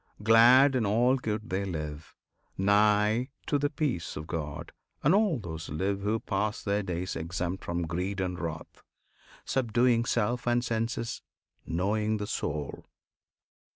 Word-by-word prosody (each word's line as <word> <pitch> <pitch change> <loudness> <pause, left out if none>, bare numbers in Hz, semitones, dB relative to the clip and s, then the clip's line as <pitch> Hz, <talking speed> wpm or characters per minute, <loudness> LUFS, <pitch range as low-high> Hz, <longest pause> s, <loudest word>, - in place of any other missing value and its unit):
Glad 120 +5 +7
in 125 - +2
all 120 +5 +3
good 110 -2 -4
they 95 +2 0
live, 75 -4 -6 0.4
Nigh 105 +4 +3 0.2
to 145 - +1
the 145 +1 +1
peace 140 - -2
of 75 - -6
God; 80 0 -5 0.3
and 150 - +5
all 200 -6 +3
those 85 -6 -7
live 95 +6 -1
Who 105 +3 0
pass 105 +1 -2
their 100 0 0
days 90 -1 -3
exempt 85 +3 -3
from 85 0 -2
greed 90 +4 -3
and 90 -1 -2
wrath, 80 -2 -6 0.6
Subduing 120 -1 +2
self 120 +1 0
and 120 0 +2
senses, 115 0 -2 0.5
knowing 105 +5 0
the 105 - -3
Soul! 75 -8 -4
105 Hz, 140 wpm, -29 LUFS, 90-120 Hz, 0.6 s, Glad